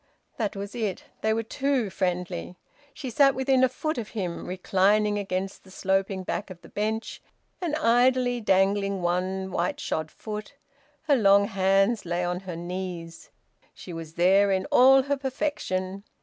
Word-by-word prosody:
That 215 Hz, -4 st, -2 dB
was 200 Hz, +1 st, -6 dB
it: 215 Hz, -6 st, -3 dB, 0.2 s
they 220 Hz, -, +1 dB
were 225 Hz, +1 st, 0 dB
too 260 Hz, -3 st, -1 dB
friendly. 180 Hz, -1 st, -2 dB, 0.4 s
She 270 Hz, -5 st, -6 dB
sat 275 Hz, +3 st, +4 dB
within 265 Hz, 0 st, +2 dB
a 260 Hz, -, +5 dB
foot 310 Hz, +3 st, -3 dB
of 220 Hz, -2 st, -6 dB
him, 180 Hz, -4 st, -3 dB
reclining 200 Hz, +3 st, +2 dB
against 190 Hz, -1 st, -3 dB
the 190 Hz, -, -17 dB
sloping 190 Hz, 0 st, -1 dB
back 195 Hz, +3 st, -3 dB
of 185 Hz, -2 st, -10 dB
the -, -, -13 dB
bench, 220 Hz, +2 st, -3 dB, 0.4 s
and 330 Hz, -4 st, -1 dB
idly 245 Hz, -2 st, +3 dB
dangling 195 Hz, -1 st, +2 dB
one 185 Hz, +2 st, -1 dB
white 175 Hz, 0 st, -1 dB
shod 155 Hz, 0 st, -2 dB
foot; 215 Hz, -, -7 dB, 0.5 s
her 300 Hz, -3 st, +3 dB
long 200 Hz, -4 st, +5 dB
hands 195 Hz, +3 st, +2 dB
lay 175 Hz, +1 st, -2 dB
on 180 Hz, 0 st, -2 dB
her 185 Hz, -3 st, -7 dB
knees. 175 Hz, -1 st, -6 dB, 0.5 s
She 180 Hz, -, -9 dB
was 165 Hz, -1 st, -8 dB
there 195 Hz, +3 st, +4 dB
in 190 Hz, 0 st, +1 dB
all 265 Hz, +1 st, +7 dB
her 285 Hz, +1 st, -1 dB
perfection. 200 Hz, -9 st, -3 dB
195 Hz, 160 wpm, -26 LUFS, 185-240 Hz, 0.5 s, all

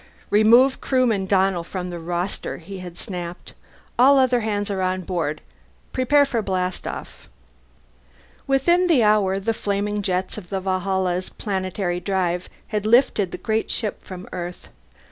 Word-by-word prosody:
"Remove 235 Hz, +6 st, +5 dB
Crewman 235 Hz, -7 st, +1 dB
Donnell 190 Hz, -2 st, +2 dB
from 180 Hz, +1 st, -5 dB
the 175 Hz, -, -5 dB
roster," 175 Hz, +3 st, -3 dB
he 190 Hz, +3 st, -9 dB
had 180 Hz, -2 st, -9 dB
snapped. 175 Hz, -4 st, -7 dB, 0.5 s
"All 275 Hz, +3 st, +7 dB
other 255 Hz, -2 st, +4 dB
hands 205 Hz, -2 st, -2 dB
are 190 Hz, -1 st, -2 dB
on 185 Hz, 0 st, 0 dB
board. 165 Hz, -4 st, -2 dB, 0.5 s
Prepare 285 Hz, +3 st, +4 dB
for 245 Hz, -5 st, -1 dB
blastoff." 185 Hz, -2 st, -4 dB, 1.2 s
Within 345 Hz, +7 st, +3 dB
the 295 Hz, -9 st, +4 dB
hour 205 Hz, -2 st, +3 dB
the 225 Hz, +4 st, -1 dB
flaming 205 Hz, 0 st, -1 dB
jets 185 Hz, +1 st, -2 dB
of 175 Hz, -, -15 dB
the 195 Hz, -, -1 dB
Valhalla's 185 Hz, -1 st, -1 dB
planetary 185 Hz, -3 st, -2 dB
drive 180 Hz, -1 st, -1 dB, 0.2 s
had 210 Hz, -2 st, -1 dB
lifted 220 Hz, -5 st, +3 dB
the -, -, -5 dB
great 220 Hz, 0 st, -1 dB
ship 215 Hz, -4 st, -3 dB
from 185 Hz, -1 st, -9 dB
Earth. 175 Hz, -1 st, -6 dB
195 Hz, 145 wpm, -23 LUFS, 180-220 Hz, 1.2 s, All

